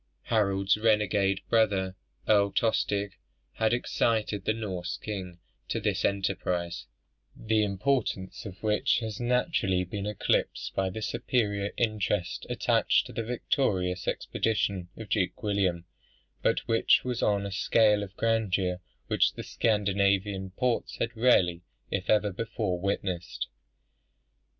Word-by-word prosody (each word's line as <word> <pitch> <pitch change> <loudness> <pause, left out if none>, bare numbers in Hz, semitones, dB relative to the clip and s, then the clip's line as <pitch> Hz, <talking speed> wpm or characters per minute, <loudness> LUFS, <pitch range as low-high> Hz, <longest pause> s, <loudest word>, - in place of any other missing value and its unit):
Harold's 100 -3 +2
renegade 105 -3 +2
brother, 100 -5 +2 0.3
Earl 100 -2 +4
Tostig, 100 -3 0 0.3
had 110 -1 +1
excited 110 -4 0
the 110 - +2
Norse 95 -6 -4
king 95 -5 -6 0.3
to - - -1
this - - -1
enterprise, 90 -6 -1 0.5
the 110 -1 +1
importance 105 -1 -1
of 100 -1 -10
which 105 -1 +2
has 110 -3 -4
naturally 120 - +1
been 100 +3 -4
eclipsed 105 -2 -1
by 95 -1 0
the 110 +4 -6
superior 105 -3 0
interest 105 -5 -1
attached - - +2
to - - -10
the - - -2
victorious 100 -6 -1
expedition 100 -5 -1
of 110 - -7
Duke 100 +4 -1
William, 95 -5 0 0.6
but - - +1
which 115 0 +4
was 125 -2 -2
on 100 -1 +2
a 100 - -4
scale 105 +2 +3
of 100 -1 -8
grandeur 100 -5 +1 0.3
which - - +2
the - - -7
Scandinavian 100 -2 +1
ports 120 +5 -1
had 115 +1 -2
rarely, 95 -8 +3 0.3
if 100 -1 -2
ever, 105 -2 +3
before 105 -3 -2
witnessed. 95 -2 -3
100 Hz, 125 wpm, -28 LUFS, 95-110 Hz, 0.6 s, Earl